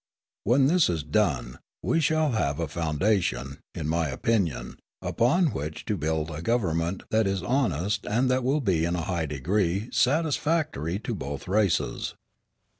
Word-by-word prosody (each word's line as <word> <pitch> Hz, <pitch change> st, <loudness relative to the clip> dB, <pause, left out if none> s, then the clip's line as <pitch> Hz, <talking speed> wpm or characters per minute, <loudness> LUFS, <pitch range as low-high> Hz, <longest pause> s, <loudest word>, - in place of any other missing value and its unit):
When 130 Hz, +5 st, +4 dB
this 170 Hz, +4 st, +4 dB
is 80 Hz, -4 st, -1 dB
done, 75 Hz, -, 0 dB, 0.2 s
we 165 Hz, -, +2 dB
shall 155 Hz, -1 st, +2 dB
have 70 Hz, -11 st, 0 dB
a 85 Hz, -, -1 dB
foundation, 80 Hz, -, 0 dB, 0.2 s
in -, -, -3 dB
my 80 Hz, 0 st, +1 dB
opinion, 90 Hz, +3 st, -1 dB, 0.2 s
upon 145 Hz, +7 st, +2 dB
which 75 Hz, +2 st, -5 dB
to 105 Hz, -, 0 dB
build 80 Hz, -1 st, -1 dB
a 75 Hz, +1 st, -5 dB
government 90 Hz, -5 st, 0 dB
that 110 Hz, -1 st, +3 dB
is 95 Hz, -2 st, -1 dB
honest 105 Hz, -, 0 dB
and 120 Hz, +5 st, +2 dB
that 130 Hz, 0 st, +1 dB
will 140 Hz, +4 st, +1 dB
be 90 Hz, -9 st, +1 dB
in 85 Hz, +1 st, 0 dB
a 85 Hz, -, -1 dB
high 85 Hz, -3 st, -1 dB
degree 90 Hz, -, 0 dB
satisfactory 145 Hz, -, +1 dB
to 105 Hz, -, -4 dB
both 70 Hz, +3 st, -5 dB
races. 100 Hz, -2 st, 0 dB
95 Hz, 155 wpm, -27 LUFS, 80-120 Hz, 0.2 s, When